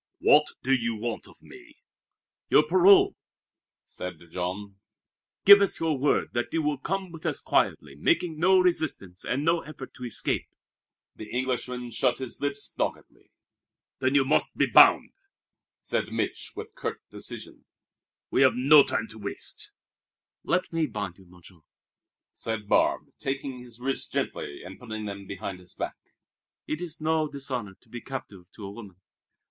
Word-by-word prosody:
"What - - +5 0.2
do 135 - +2
you 120 -3 +1
want 115 +1 -4
of - - -19
me?" - - -15 0.7
"Your 150 - +6
parole!" 185 +5 +6 0.7
said 90 0 -7
Jean. 95 +3 -4 0.7
"Give 200 0 +10
us 200 - +2
your 160 -2 +1
word 140 +2 +1
that 120 0 -1
you 165 -1 0
will 150 -2 0
come 190 +3 -3
with 165 -2 -11
us - - 0
quietly, 70 -2 0
making 155 - +1
no 190 +3 +5
resistance 155 - 0
and 140 +4 -1
no 165 +1 +3
effort 140 -3 -10
to 125 - -11
escape." 120 -3 -2 0.7
The 110 - -9
Englishman 125 -1 -2
shut 120 +2 +1
his 130 -2 -7
lips 145 0 -2
doggedly. - - -4 0.7
"Then 130 +1 +1
you 135 -1 +5
must 145 - +1
be - - +4
bound," - - +6 0.7
said - - -2
Mich' - - -3
with 435 +1 -8
curt - - -5
decision. - - -8 0.7
"We've 130 -4 +4
no 140 +4 +7
time 110 - -1
to 110 - -11
waste." 100 -1 -6 0.7
"Let 180 -1 0
me 165 -2 +1
bind 100 -6 -5
you, 95 - -18
Monsieur," 90 0 -15 0.7
said 110 -2 -4
Barbe, - - +2
taking 135 -1 -3
his 120 -1 -9
wrists 135 +2 0
gently 70 - -3
and 95 +1 -10
putting 110 -3 -6
them 100 -1 -7
behind 95 -1 -6
his 90 -1 -12
back. - - -4 0.7
"It 155 +2 -3
is 175 -4 -4
no 155 0 +1
dishonor 130 -8 -4
to - - -24
be 120 - -7
captive 105 -9 -8
to 105 - -8
a 100 - -6
woman." 100 -4 -11
130 Hz, 155 wpm, -27 LUFS, 105-155 Hz, 0.7 s, Give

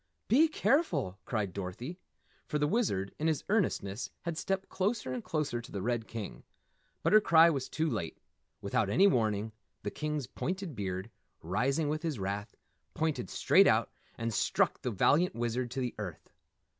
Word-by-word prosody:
"Be 300 +7 +6
careful!" 195 - +1
cried 105 -6 -2
Dorothy. 100 - -5 0.5
For 150 - -1
the 150 - +2
Wizard, 145 - 0
in 155 - +1
his 160 -3 +1
earnestness, 125 - 0
had 170 -2 -2
stepped 195 +4 -2
closer 200 - -1
and 125 - -4
closer 150 -7 -1
to 115 - -12
the 100 -2 -4
red 120 -1 -1
King. 100 - -6 0.6
But - - +2
her 215 - +8
cry 165 -2 +7
was 135 -4 -3
too 160 +1 0
late. 85 - -3 0.4
Without 105 0 0
any 190 - +5
warning, 110 - +2 0.3
the - - -2
King's 150 -2 -2
pointed 185 +4 -4
beard, 95 +1 -4 0.3
rising 130 - +1
with 155 +1 -1
his 160 -5 -2
wrath, 100 +1 -4 0.4
pointed 155 - -1
straight - - +5
out - - +3 0.3
and 115 0 -2
struck - - +1
the - - -1
valiant 150 - +3
Wizard 120 +1 -1
to 130 - -4
the 125 -2 -2
earth. 90 -7 -7
130 Hz, 170 wpm, -31 LUFS, 105-165 Hz, 0.6 s, her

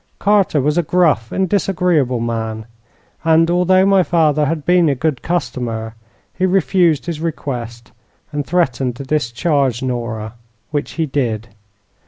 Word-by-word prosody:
"Carter 200 -6 +2
was 150 +5 +1
a - - +4
gruff 160 -9 +1
and 190 0 0
disagreeable 170 - +1
man, 110 -1 -3 0.6
and, 165 +1 +3
although 185 +2 +3
my 195 -1 +4
father 155 -4 +2
had 155 -1 -3
been 175 -2 +4
a 140 - +1
good 140 -1 -1
customer, 120 -10 -3 0.4
he - - -4
refused 185 -4 +2
his 165 -3 -4
request 120 -7 -5 0.4
and 145 -1 -2
threatened 135 -6 0
to 140 - -7
discharge 135 -1 0
Nora, 115 -3 -4 0.4
which 145 0 -3
he 165 - -1
did. 120 -6 -2
150 Hz, 140 wpm, -18 LUFS, 120-175 Hz, 0.6 s, a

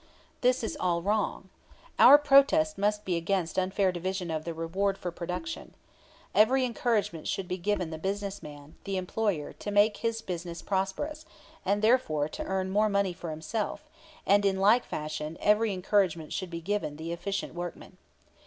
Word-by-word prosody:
This 250 -1 +2
is 225 - -2
all 170 -2 0
wrong. 205 -1 -1 0.5
Our 285 - +10
protest 295 +2 +4
must 210 +1 0
be 180 -2 0
against 170 0 -1
unfair 190 +1 +1
division 180 0 -3
of 155 -1 -3
the 170 - -3
reward 190 +5 -1
for 175 - -4
production. 180 - -6 0.6
Every 255 +5 +4
encouragement 225 -9 -1
should 195 -2 -2
be 185 0 -3
given 185 -2 -1
the 160 - -6
business 200 +2 -3
man, 145 0 -11
the 195 -1 -2
employer, 185 -4 -2
to - - -7
make 205 +1 +3
his 230 -1 -2
business 170 -2 -5
prosperous, 200 +11 -2 0.4
and 205 +2 0
therefore 215 - +3
to - - -5
earn 190 0 -2
more 210 +2 +3
money 200 -2 +1
for 175 -1 -7
himself; 200 - -4 0.4
and 200 +1 +4
in 195 -1 +2
like 215 +5 +4
fashion 155 +1 -5
every 210 +1 +3
encouragement 185 -4 0
should 185 - -3
be 170 0 -6
given 200 -4 -2
the 160 +2 -6
efficient 195 +4 -3
workman. 175 0 -7
195 Hz, 165 wpm, -29 LUFS, 170-210 Hz, 0.6 s, Our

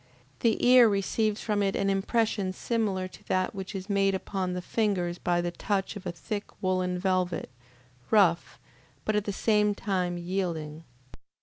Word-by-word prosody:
The 230 -2 +2
ear 245 -2 +8
receives 210 +2 0
from 210 -2 0
it 195 -1 +1
an 200 - 0
impression 195 0 0
similar 200 -3 -1
to - - -15
that 185 0 0
which 195 0 -6
is 190 0 -5
made 195 -1 +2
upon 190 -1 -3
the 180 - -3
fingers 180 -6 0
by 175 -1 +1
the 175 0 -2
touch 195 +3 -2
of 205 -2 -7
a - - -1
thick 205 +4 -5
woolen 185 -1 0
velvet, 180 -6 -1 0.6
rough, 185 -6 +3 0.5
but 215 - +1
at 210 -1 +1
the 205 - -1
same 210 0 +2
time, 180 -4 -1
yielding. 170 -4 -3
195 Hz, 165 wpm, -28 LUFS, 180-210 Hz, 0.6 s, ear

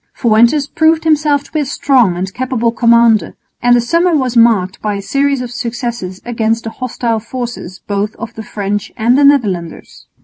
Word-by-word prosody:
_ - - -24
Fuentes 235 +5 +3
proved 315 +2 +1
himself 300 -2 +2
to - - -19
be 310 - -1
a 295 - -1
strong 250 -8 +1
and 190 +2 -4
capable 250 -2 -1
commander; 235 -5 +3 0.3
and 245 0 +4
the 240 - +3
summer 335 +7 +1
was 255 -4 -1
marked 220 -6 +2
by 210 -1 -2
a - - -4
series 275 +6 0
of 245 -1 -6
successes 235 -6 -5
against 230 -1 -1
the 225 - -5
hostile 235 -2 -3
forces 235 -5 -7
both 205 +1 -2
of 230 +1 -8
the 220 - -8
French 205 -1 -4
and 235 +3 +2
the 285 - +3
Netherlanders. 205 - 0
235 Hz, 190 wpm, -14 LUFS, 215-265 Hz, 0.3 s, and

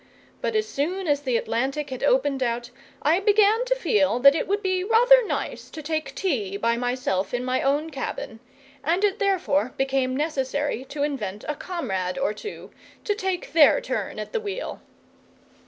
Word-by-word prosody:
But 455 - -1
as 435 0 +1
soon 360 +4 -2
as 290 -1 +2
the 255 -4 +1
Atlantic 270 +6 -2
had 255 - -5
opened 270 0 +2
out 240 0 -2 0.3
I 320 +5 +4
began 420 +3 +4
to - - +1
feel 210 - +2
that 275 +1 +8
it 315 - -2
would 410 +2 -1
be 370 -1 0
rather 485 +4 +6
nice - - -4
to 310 - -8
take 315 +1 -3
tea 215 - -1
by 230 +3 +1
myself 245 -5 -1
in 245 +1 -2
my 255 0 0
own 290 +4 0
cabin, 245 -4 -5 0.4
and 345 +6 +1
it 405 -2 +2
therefore 360 -9 +1
became 265 -1 0
necessary 285 -3 -1
to 285 +2 -3
invent 215 -9 -3
a 300 - 0
comrade 195 - -3
or 275 -6 0
two, 420 - -9 0.3
to 415 - +1
take 380 -7 -3
their 320 +8 +6
turn - - -4
at - - -6
the 460 - 0
wheel. 425 +3 -5
290 Hz, 175 wpm, -24 LUFS, 255-380 Hz, 0.4 s, that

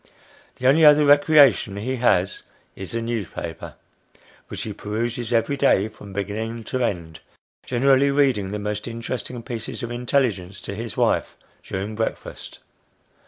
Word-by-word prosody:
The 130 - -7
only 145 +5 +5
other 150 0 +7
recreation 145 -7 +5
he 130 +6 -3
has, 100 -6 +2 0.3
is 95 - -7
the 115 0 -2
newspaper, 100 -8 -5 0.7
which - - -6
he - - -5
peruses 115 +3 -3
every 120 +4 +1
day, 120 -7 +3
from 105 -2 -13
beginning 110 +4 -4
to 130 +3 -2
end, 85 -7 -3 0.5
generally 135 +2 +3
reading 135 -9 +2
the 105 - -3
most 105 +1 -4
interesting 120 +1 -5
pieces 115 -1 -6
of 120 - -4
intelligence 120 -7 -1
to - - -6
his 110 -1 -6
wife, - - +1 0.2
during 100 +3 -5
breakfast. 110 +1 -5
115 Hz, 140 wpm, -23 LUFS, 100-130 Hz, 0.7 s, other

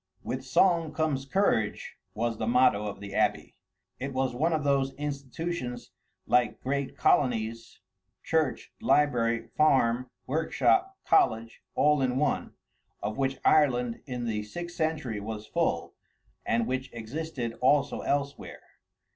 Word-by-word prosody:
"With 130 +1 -4
song 165 +4 +2
comes 145 -4 -1
courage" 135 - 0 0.2
was 115 0 -1
the 110 - -2
motto 115 -4 +3
of 100 -1 -6
the 100 -1 -8
abbey. - - 0 0.4
It 135 +1 -4
was 130 -1 0
one 155 +7 +1
of 155 -2 0
those 135 -1 +1
institutions 140 -1 -4 0.3
like 125 0 +2
great 140 +1 -2
colonies, 115 -3 +1 0.4
church, 160 -5 -1
library, 120 - +2
farm, 130 -5 +3 0.2
workshop, 165 - +1
college, 115 - +2
all 150 -1 +3
in 130 -1 +1
one, 150 +1 -1 0.5
of 105 +4 -3
which 135 0 0
Ireland 125 -6 +3
in 125 -2 -4
the 110 -2 -1
sixth 175 +12 -7
century 155 -10 -1
was 105 +1 -6
full, - - -1 0.5
and 115 0 +2
which 130 +2 -3
existed 120 +1 -4
also 140 +2 +3
elsewhere. 140 0 -3
130 Hz, 130 wpm, -28 LUFS, 115-150 Hz, 0.5 s, motto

